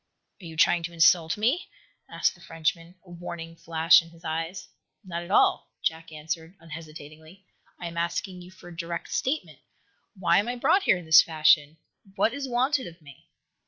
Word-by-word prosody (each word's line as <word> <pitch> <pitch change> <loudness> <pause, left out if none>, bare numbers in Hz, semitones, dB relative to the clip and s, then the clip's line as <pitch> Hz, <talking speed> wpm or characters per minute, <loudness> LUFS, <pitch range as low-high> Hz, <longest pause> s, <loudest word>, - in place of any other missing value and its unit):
"Are - - -11
you 160 -1 -9
trying 175 +1 +4
to 170 - -8
insult 165 0 +4
me?" 250 - 0 0.4
asked - - 0
the - - -20
Frenchman, 165 +2 -3
a 175 - -15
warning 170 -1 -8
flash 165 +1 +4
in 165 - -15
his 165 +1 -18
eyes. 165 +4 -4 0.4
"Not 170 -3 -5
at 175 - -10
all," 200 - +3
Jack 165 0 -2
answered, 160 +3 -6
unhesitatingly. 160 +2 -12 0.3
"I 175 - -7
am 170 0 -6
asking 180 +2 -3
you 175 - -12
for 185 -1 -14
a 175 - -11
direct 170 0 -5
statement. 285 +4 -2 0.6
Why 175 -2 +3
am 205 - -1
I 245 - -2
brought 305 +10 +3
here - - +4
in 175 - -10
this 160 0 +8
fashion? 155 -1 +3 0.4
What 225 - +2
is 275 -1 -5
wanted 260 +3 +1
of 170 0 -12
me?" 145 -4 -17
170 Hz, 185 wpm, -26 LUFS, 160-185 Hz, 0.6 s, this